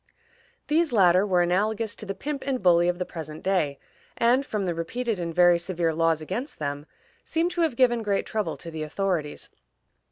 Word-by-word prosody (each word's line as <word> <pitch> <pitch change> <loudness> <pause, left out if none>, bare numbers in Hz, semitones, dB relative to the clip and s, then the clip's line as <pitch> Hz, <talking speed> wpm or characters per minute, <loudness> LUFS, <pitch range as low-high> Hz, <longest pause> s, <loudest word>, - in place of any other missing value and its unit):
These 315 +1 +2
latter 190 -2 +4
were 180 -2 +3
analogous 210 +5 0
to 215 - -6
the 195 - -3
pimp 280 +7 -4
and 260 -4 -1
bully 175 -1 +5
of 175 0 0
the 180 - -2
present 155 -3 -8
day, 165 -8 0 0.4
and, 245 +3 +3
from 210 -8 -3
the 175 - -1
repeated 215 +6 -3
and 170 -1 -3
very 175 0 +5
severe 170 -2 -1
laws 165 0 +1
against 230 - -5
them, 145 0 -4 0.4
seem 330 +2 0
to 355 -1 -2
have 320 -7 +1
given 240 -2 +3
great 205 -2 0
trouble 215 -2 -2
to 165 - -9
the 160 -1 -6
authorities. 155 -1 -3
185 Hz, 190 wpm, -26 LUFS, 170-235 Hz, 0.4 s, bully